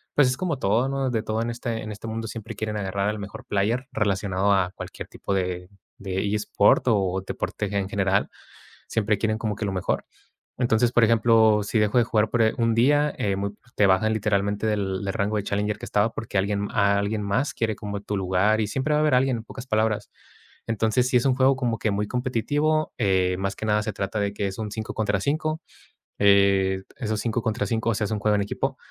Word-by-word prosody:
pues, 145 Hz, -3 st, +5 dB
es 130 Hz, -, -1 dB
como 165 Hz, -4 st, -1 dB
todo, 115 Hz, +6 st, +2 dB
¿no?, 135 Hz, -1 st, -1 dB
de 115 Hz, -2 st, 0 dB
todo 110 Hz, 0 st, -1 dB
en 120 Hz, -, -2 dB
este 115 Hz, -1 st, -4 dB
en 110 Hz, -, -6 dB
este 105 Hz, +2 st, -8 dB
mundo, 110 Hz, 0 st, -4 dB
siempre 115 Hz, 0 st, -7 dB
quieren 105 Hz, 0 st, -3 dB
agarrar 100 Hz, 0 st, -1 dB
el 105 Hz, -, -6 dB
mejor 100 Hz, 0 st, -8 dB
player, 115 Hz, +6 st, 0 dB
relacionado 100 Hz, -3 st, 0 dB
a 95 Hz, -2 st, +1 dB
cualquier -, -, -8 dB
tipo 100 Hz, -, -4 dB
de 90 Hz, -1 st, -2 dB, 0.3 s
de 95 Hz, -2 st, -4 dB
e-sport 105 Hz, 0 st, +2 dB
o 95 Hz, -5 st, +2 dB
deporte, -, -, -3 dB
en 95 Hz, -1 st, -1 dB
general. 100 Hz, 0 st, +1 dB, 0.6 s
Siempre 105 Hz, -2 st, +1 dB
quieren 110 Hz, +1 st, 0 dB
como 110 Hz, -2 st, -2 dB
que 110 Hz, -, -4 dB
lo 100 Hz, -, -2 dB
mejor, 95 Hz, -1 st, -1 dB, 0.6 s
entonces, 120 Hz, -1 st, +2 dB
por 120 Hz, -1 st, +4 dB
ejemplo, 110 Hz, -1 st, +4 dB
si 105 Hz, -, -1 dB
dejo 105 Hz, +3 st, +3 dB
de -, -, +4 dB
jugar 110 Hz, -1 st, +1 dB
por, 120 Hz, -, +2 dB
eh, 110 Hz, -, +2 dB
un 115 Hz, -2 st, +2 dB
día, 145 Hz, +5 st, +3 dB
eh, 100 Hz, -1 st, 0 dB
muy 100 Hz, +1 st, -2 dB, 0.2 s
te 105 Hz, -, +4 dB
bajan, 95 Hz, +3 st, +3 dB
literalmente, 100 Hz, -1 st, 0 dB
del 100 Hz, -3 st, -1 dB
del 95 Hz, -, -2 dB
rango 105 Hz, +1 st, 0 dB
de 105 Hz, -, -1 dB
challenger 105 Hz, +1 st, -1 dB
que -, -, -7 dB
estaba, 105 Hz, +2 st, +1 dB
porque 110 Hz, -, -4 dB
alguien 100 Hz, +1 st, -1 dB
a 100 Hz, -1 st, +3 dB
alguien 105 Hz, +1 st, -1 dB
más 100 Hz, +8 st, 0 dB
quiere 110 Hz, -2 st, -1 dB
como 100 Hz, 0 st, -5 dB
tu 105 Hz, 0 st, -3 dB
lugar. 95 Hz, +3 st, +2 dB
Y -, -, +1 dB
siempre 135 Hz, +8 st, -1 dB
va -, -, +3 dB
a -, -, +2 dB
haber 155 Hz, -3 st, +2 dB
alguien, 130 Hz, -1 st, +2 dB
en 110 Hz, -, -7 dB
pocas 125 Hz, +2 st, -10 dB
palabras. 110 Hz, -2 st, 0 dB, 0.6 s
Entonces, 115 Hz, +2 st, +1 dB
sí 130 Hz, -, 0 dB
es 120 Hz, -, 0 dB
un 130 Hz, -2 st, +3 dB
juego 130 Hz, +1 st, +4 dB
como 120 Hz, -4 st, -1 dB
que 105 Hz, -, 0 dB
muy 105 Hz, +1 st, -1 dB
competitivo, 145 Hz, +6 st, 0 dB
eh, 95 Hz, -4 st, +2 dB
más 100 Hz, 0 st, -2 dB
que -, -, -5 dB
nada 105 Hz, 0 st, +2 dB
se 110 Hz, -, -3 dB
trata 100 Hz, +2 st, -3 dB
de 100 Hz, 0 st, -1 dB
que 100 Hz, -1 st, -2 dB
es 95 Hz, -, -6 dB
un 105 Hz, -2 st, -4 dB
5 110 Hz, +1 st, -5 dB
contra 105 Hz, -3 st, 0 dB
5, 155 Hz, +5 st, -1 dB, 0.6 s
eh, 100 Hz, -1 st, +4 dB, 0.2 s
esos 110 Hz, -2 st, -2 dB
5 115 Hz, +1 st, -1 dB
contra 105 Hz, -3 st, -1 dB
5, 115 Hz, +2 st, 0 dB
o -, -, 0 dB
sea, 105 Hz, 0 st, -1 dB
es -, -, -6 dB
un 105 Hz, -, 0 dB
juego 105 Hz, +1 st, +2 dB
en 100 Hz, -, +1 dB
equipo, 135 Hz, +6 st, -2 dB
105 Hz, 230 wpm, -25 LUFS, 100-115 Hz, 0.6 s, pues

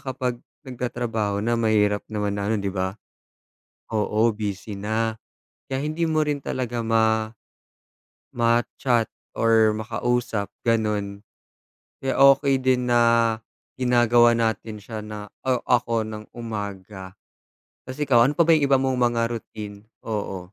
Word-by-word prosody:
kapag 130 Hz, -2 st, -3 dB, 0.3 s
nagtatrabaho 115 Hz, -4 st, -2 dB
na 115 Hz, +2 st, 0 dB
mahirap 105 Hz, -2 st, +2 dB
naman 105 Hz, -1 st, -1 dB
na 100 Hz, 0 st, -2 dB
ano, 110 Hz, -, 0 dB
'di 100 Hz, -, -2 dB
ba, 95 Hz, 0 st, -2 dB, 1.0 s
oo, 110 Hz, +1 st, +1 dB
busy 100 Hz, -1 st, -5 dB
na. 110 Hz, +2 st, -1 dB, 0.5 s
Kaya 135 Hz, +1 st, -2 dB
hindi 160 Hz, +2 st, -1 dB
mo 155 Hz, -1 st, +2 dB
rin 145 Hz, -1 st, -2 dB
talaga 120 Hz, -3 st, -3 dB
ma 110 Hz, -1 st, +2 dB, 1.1 s
ma-chat 120 Hz, 0 st, +1 dB, 0.2 s
or 110 Hz, -1 st, +4 dB
makausap, 110 Hz, 0 st, -2 dB, 0.2 s
gano'n, 105 Hz, -3 st, 0 dB, 0.8 s
kaya 135 Hz, 0 st, -1 dB
okay 135 Hz, 0 st, +5 dB
din 130 Hz, -1 st, +2 dB
na, 115 Hz, -1 st, +4 dB, 0.4 s
ginagawa 120 Hz, -1 st, +4 dB
natin 110 Hz, -1 st, -1 dB
siya 110 Hz, +1 st, -7 dB
na, 105 Hz, -1 st, -7 dB, 0.2 s
o 130 Hz, -1 st, +2 dB
ako 115 Hz, -2 st, +1 dB
ng 110 Hz, -1 st, -7 dB
umaga. 100 Hz, -4 st, -6 dB, 0.7 s
'Tas 130 Hz, +3 st, -9 dB
ikaw, 130 Hz, -5 st, +4 dB
ano 135 Hz, -, +3 dB
pa 170 Hz, -, +6 dB
ba 165 Hz, -, +7 dB
'yong 150 Hz, -, +1 dB
iba 135 Hz, -1 st, +5 dB
mong 130 Hz, -1 st, 0 dB
mga 115 Hz, -1 st, 0 dB
routine? 105 Hz, -2 st, -8 dB, 0.2 s
Oo. 105 Hz, -3 st, -3 dB
115 Hz, 130 wpm, -24 LUFS, 105-125 Hz, 1.1 s, ba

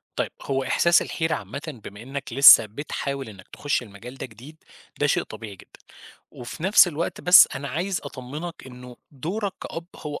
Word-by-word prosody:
طيب -, -, -2 dB
هو 135 Hz, -1 st, -2 dB
إحساس 170 Hz, +6 st, +3 dB
الحيرة 160 Hz, -1 st, -2 dB
عامةً 135 Hz, -, -8 dB
بما 105 Hz, +1 st, -10 dB
إنّك 135 Hz, +1 st, -7 dB
لسّه 140 Hz, -3 st, +9 dB
بتحاول 140 Hz, +2 st, -5 dB
إنّك 100 Hz, -2 st, -14 dB
تخُش 145 Hz, -3 st, -2 dB
المجال 115 Hz, +4 st, -12 dB
ده -, -, -6 dB
جديد، 130 Hz, +7 st, -15 dB, 0.4 s
ده -, -, +2 dB
شيء -, -, +1 dB
طبيعي 105 Hz, -3 st, -10 dB
جدًا، -, -, -19 dB, 0.5 s
وفي 125 Hz, +6 st, -10 dB
نفْس 190 Hz, -1 st, +6 dB
الوقت 165 Hz, +1 st, -4 dB
بس 180 Hz, 0 st, +8 dB
أنا 135 Hz, +1 st, -5 dB
عايز 180 Hz, +3 st, -3 dB
أطمنك 145 Hz, +5 st, -8 dB
إنه 125 Hz, -1 st, -12 dB
دورَك 185 Hz, -, -4 dB
كأب 165 Hz, 0 st, -7 dB
هو 150 Hz, -1 st, -7 dB
140 Hz, 170 wpm, -24 LUFS, 120-160 Hz, 0.5 s, لسّه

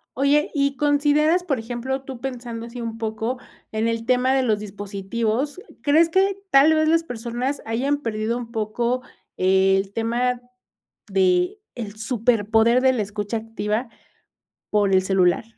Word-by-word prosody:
Oye, 280 Hz, +2 st, +3 dB
¿y 280 Hz, -1 st, 0 dB
consideras, 295 Hz, +4 st, +3 dB
por 275 Hz, -8 st, -1 dB
ejemplo, 245 Hz, +4 st, -3 dB
tú 265 Hz, -2 st, -8 dB
pensando 240 Hz, -3 st, -5 dB
así 235 Hz, +1 st, -8 dB
un 230 Hz, -1 st, -5 dB
poco 225 Hz, +2 st, -3 dB, 0.3 s
en 220 Hz, +1 st, 0 dB
el 230 Hz, 0 st, -2 dB
tema 255 Hz, +1 st, +2 dB
de 270 Hz, -, +3 dB
los 215 Hz, -4 st, +1 dB
dispositivos? 215 Hz, -, -3 dB, 0.2 s
¿Crees 315 Hz, +3 st, +4 dB
que 385 Hz, +3 st, +2 dB
tal 285 Hz, +1 st, +6 dB
vez 310 Hz, 0 st, +2 dB
las 330 Hz, +1 st, +3 dB
personas 245 Hz, 0 st, -3 dB
hayan 260 Hz, +6 st, 0 dB
perdido 225 Hz, -3 st, -2 dB
un 235 Hz, -2 st, -7 dB
poco 235 Hz, +3 st, -1 dB, 0.4 s
el 190 Hz, +1 st, +2 dB
tema 240 Hz, +2 st, 0 dB, 0.7 s
de 365 Hz, +1 st, +2 dB, 0.2 s
el 220 Hz, -4 st, -6 dB
superpoder 225 Hz, 0 st, +2 dB
de 260 Hz, 0 st, +5 dB
la 230 Hz, -4 st, 0 dB
escucha 205 Hz, +2 st, -3 dB
activa 225 Hz, +1 st, -3 dB, 0.8 s
por 205 Hz, -2 st, +2 dB
el 190 Hz, 0 st, +5 dB
celular? 185 Hz, 0 st, +2 dB
235 Hz, 145 wpm, -23 LUFS, 220-275 Hz, 0.8 s, tal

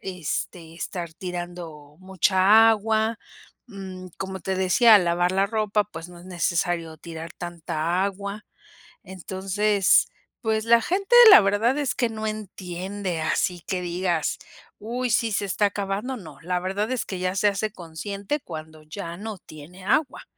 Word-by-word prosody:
este, 170 Hz, -2 st, -5 dB
estar 170 Hz, -1 st, -5 dB
tirando 175 Hz, -4 st, -7 dB
mucha 190 Hz, +4 st, +5 dB
agua, 220 Hz, 0 st, 0 dB, 0.5 s
mm, 190 Hz, -4 st, -9 dB
como 190 Hz, -1 st, -5 dB
te 190 Hz, -, -2 dB
decía 210 Hz, +4 st, +6 dB
lavar 175 Hz, -1 st, +2 dB
la 195 Hz, +1 st, +2 dB
ropa, 210 Hz, -1 st, 0 dB
pues, 165 Hz, -3 st, -9 dB
no 175 Hz, -1 st, -13 dB
es -, -, -14 dB
necesario 170 Hz, -2 st, -1 dB
tirar 165 Hz, +1 st, -9 dB
tanta 170 Hz, 0 st, -2 dB
agua. 200 Hz, +1 st, -5 dB, 0.6 s
Entonces 190 Hz, +2 st, +1 dB, 0.3 s
pues 220 Hz, -1 st, 0 dB
la 230 Hz, 0 st, +5 dB
gente 390 Hz, -, 0 dB, 0.2 s
la 395 Hz, -, +11 dB
verdad 215 Hz, +7 st, +1 dB
es 270 Hz, -4 st, -1 dB
que 240 Hz, -3 st, +1 dB
no 220 Hz, -1 st, -5 dB
entiende 190 Hz, -3 st, -5 dB
así 175 Hz, +2 st, 0 dB
que 185 Hz, -1 st, -2 dB
digas: 175 Hz, -2 st, -1 dB, 0.4 s
"Uy 245 Hz, +3 st, -3 dB
sí 225 Hz, 0 st, +2 dB
se 205 Hz, -, -1 dB
está 200 Hz, +2 st, +1 dB
acabando", 205 Hz, +5 st, -3 dB
¿no? 155 Hz, -, -12 dB
La 180 Hz, +1 st, -1 dB
verdad 195 Hz, +5 st, -2 dB
es 255 Hz, -, -1 dB
que 185 Hz, -2 st, -5 dB
ya 185 Hz, +1 st, -1 dB
se 205 Hz, -, +2 dB
hace 205 Hz, +1 st, 0 dB
consciente 200 Hz, -, -5 dB
cuando 155 Hz, -3 st, -9 dB
ya 170 Hz, +2 st, -7 dB
no 210 Hz, 0 st, -6 dB
tiene 170 Hz, +4 st, -13 dB
agua. 265 Hz, +7 st, 0 dB
190 Hz, 150 wpm, -24 LUFS, 175-215 Hz, 0.6 s, la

